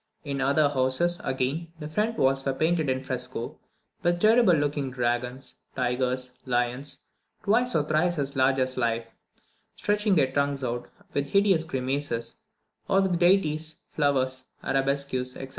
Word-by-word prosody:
In 140 -3 -3
other 140 +2 +3
houses, 140 +6 +1
again, 135 +5 -1
the 150 - -5
front 215 +8 -1
walls 135 0 +2
were 135 -1 -1
painted 160 -1 +1
in 130 0 -1
fresco, 125 -2 -4 0.4
with 175 0 +1
terrible 220 -2 +5
looking 145 -2 0
dragons, 125 +1 -2 0.2
tigers, 125 0 -1
lions, 125 +2 -1 0.4
twice 240 +4 +2
or 150 - +3
thrice 155 +3 +1
as 140 -1 -2
large 130 0 +3
as 130 -1 0
life, 115 -1 -1 0.6
stretching 205 -1 +1
their 135 -5 +3
tongues 140 0 0
out, 120 0 -3 0.2
with 140 0 0
hideous 195 -2 +3
grimaces; 130 -4 -2 0.5
or 195 - +4
with 185 -3 +1
deities, 160 -4 +2
flowers, 130 -3 0 0.2
arabesques, 135 -2 -1
etc. 135 - -7
140 Hz, 140 wpm, -27 LUFS, 130-160 Hz, 0.6 s, terrible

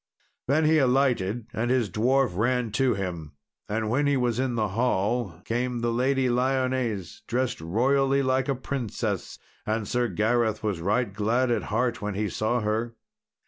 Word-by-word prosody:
Then 155 +4 +3
he 155 0 +4
alighted, 125 -5 +1
and 120 +2 -1
his 125 -3 +2
dwarf 120 +2 +1
ran 120 +2 0
to 125 +1 +2
him. 85 -6 -5 0.4
And 110 +1 -1
when 140 +6 +1
he 140 -1 +2
was 120 -2 0
in 130 -2 0
the 110 -2 0
hall 105 -3 0
came 120 +1 -1
the 120 0 0
Lady 130 +2 +1
Lyones 125 -5 -1
dressed 125 -5 -1
royally 135 +10 +2
like 130 +1 +1
a 135 - +1
princess. 130 -3 -3 0.3
And 110 -1 -2
Sir 125 0 +1
Gareth 110 +2 0
was 100 -6 -1
right 105 +3 0
glad 115 +5 +1
of 120 - +1
heart 120 +3 -1
when 105 -1 -3
he 105 0 -1
saw 110 +5 0
her. 110 +2 -1
120 Hz, 165 wpm, -26 LUFS, 105-130 Hz, 0.4 s, he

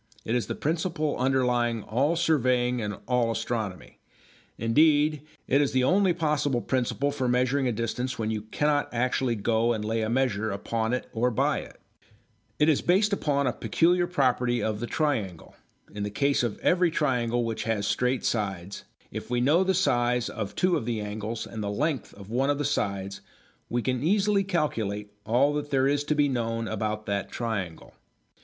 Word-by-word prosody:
It 110 - -1
is 120 -2 0
the - - -3
principle 155 -1 -1
underlying 125 -3 +1
all 140 +9 +1
surveying 125 -7 +2
and 105 -1 -3
all 125 -2 +2
astronomy; 110 -5 -4 0.6
indeed 150 +5 +3 0.3
it 140 +2 +4
is 145 - 0
the 130 -1 +3
only 190 +6 +4
possible 150 -6 0
principle 130 +2 0
for 130 -3 -2
measuring 125 +2 +2
a - - +1
distance 120 +3 -3
when 110 -1 -1
you 110 -1 -2
cannot 145 +7 0
actually 125 0 0
go 115 +2 +1
and 105 -2 -3
lay 110 +1 0
a 110 - -1
measure 115 -4 0
upon 110 +3 -2
it 125 - -2
or 120 +2 +2
by 115 - +1
it. - - -11 0.8
It 150 - +3
is 155 -3 +3
based 200 +4 +3
upon 140 -7 +1
a 125 - +1
peculiar 175 - +2
property 125 -7 +1
of 110 -1 -2
a 120 - -2
triangle. 110 - -2 0.4
In 105 - -5
the 105 - -1
case 140 +7 +1
of 120 -4 -2
every 180 -1 +3
triangle 120 -6 0
which 115 -1 -3
has 110 -3 0
straight 125 +4 0
sides, 100 -4 -2 0.3
if - - -6
we 120 0 +1
know 150 +9 +4
the 190 0 +1
size 120 -9 +1
of 105 -3 -5
two 180 -1 +2
of 120 -6 -5
the 115 -2 -1
angles 105 +2 -4
and 110 - -7
the 100 - -2
length 135 +4 -1
of 100 +1 -12
one 135 +4 +1
of 145 - +2
the 145 - -2
sides 100 -7 -2 0.5
we 120 0 -1
can 125 -2 -1
easily 200 +4 +2
calculate 110 - -2
all 130 +6 +3
that 145 0 -3
there 135 -1 +2
is 145 +1 +1
to 150 - 0
be 145 -1 +3
known 115 -3 -2
about 110 0 -3
that 100 -1 -2
triangle. 100 -8 -4
125 Hz, 185 wpm, -27 LUFS, 110-145 Hz, 0.8 s, it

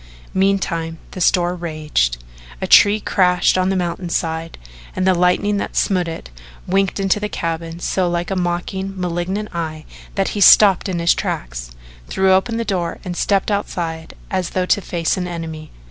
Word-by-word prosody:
Meantime 180 -4 0
the 185 - -7
storm 175 0 +2
raged. 150 - -1 0.4
A - - -2
tree 205 +1 +6
crashed 180 -3 +2
on 185 0 +1
the 195 - 0
mountainside 170 -2 -2 0.4
and 185 - 0
the 190 - +4
lightning 180 +4 +2
that - - -4
smote 180 -3 +1
it 165 - -7 0.3
winked 195 +1 0
into 195 +1 +1
the 210 0 -3
cabin 165 -1 -4
so 180 0 0
like 175 +2 -2
a - - 0
mocking, 185 +2 -3
malignant 180 +4 -3
eye 155 -2 -4 0.3
that 195 -1 +1
he 205 - -3
stopped 200 0 +7
in 180 - -2
his 170 0 +3
tracks, - - -4 0.4
threw 190 0 +2
open 225 +5 +1
the 230 - -2
door 180 -5 -2
and 180 -1 -4
stepped 200 +3 +1
outside 165 -5 -3 0.2
as 185 -2 -1
though 185 - +2
to 200 - +2
face 170 -2 -1
an 180 -1 -2
enemy. 160 -3 -6
180 Hz, 170 wpm, -19 LUFS, 165-195 Hz, 0.4 s, stopped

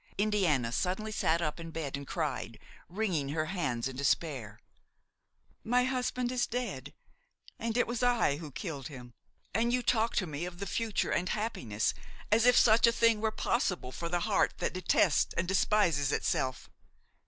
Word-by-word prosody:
Indiana 185 - +1
suddenly 190 - -1
sat 170 -5 +1
up 150 +1 -2
in 165 0 -7
bed 160 -4 -4
and 140 -1 -7
cried, 135 -8 -3 0.3
wringing 175 -7 -1
her 155 +2 -1
hands 130 -10 -1
in 135 - -7
despair: 130 -6 -1 1.0
"My 245 +2 +2
husband 250 -1 -1
is 250 -1 0
dead! 245 +1 -4 0.6
and 230 0 -2
it 245 - +3
was 240 +1 -3
I 240 -12 +2
who 155 -1 -8
killed 145 -2 -5
him! 125 -4 -11 0.4
And 235 +2 +1
you 250 0 +1
talk 230 -1 +1
to 190 - +1
me 155 +1 -4
of 180 -1 -7
the 200 - -4
future 220 +1 -1
and 180 +1 0
happiness, 120 - -1 0.4
as 225 +3 +5
if 245 - +6
such 230 +1 +6
a - - +5
thing 230 -2 +3
were 220 - +2
possible 210 - -1
for 170 +5 -5
the 175 0 0
heart 205 +2 +1
that - - -2
detests 185 0 +2
and 170 - 0
despises 175 -7 +2
itself! 130 -2 -1
180 Hz, 170 wpm, -31 LUFS, 145-225 Hz, 1.0 s, if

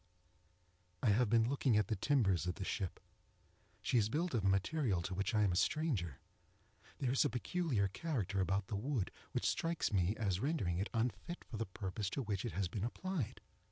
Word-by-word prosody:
I 120 - +4
have 110 +2 +4
been 115 0 +4
looking 130 -3 +2
at 105 - +3
the 110 - 0
timbers 95 - +2
of 90 - -1
the 100 - -4
ship. 95 -2 -2 0.8
She 120 - +3
is 105 -1 +2
built 165 +6 0
of 115 -5 +1
a - - +3
material 100 - +1
to 95 - -3
which 100 +3 -1
I 105 - +4
am 100 - +3
a - - 0
stranger. 100 - 0 0.8
There 130 -3 0
is 135 - +4
a 145 - +2
peculiar 125 - 0
character 100 - -1
about 95 +1 +1
the 100 - -4
wood 115 0 -1 0.2
which - - -1
strikes 165 -8 0
me 95 +2 +2
as 95 -5 0
rendering 110 - 0
it 100 - -1
unfit 115 - -2
for 115 - -7
the 115 - -2
purpose 95 +1 -3
to 135 - 0
which 100 -2 -2
it 120 - -3
has 100 -2 0
been 95 +3 -4
applied. 155 - -3
110 Hz, 200 wpm, -37 LUFS, 95-130 Hz, 0.8 s, I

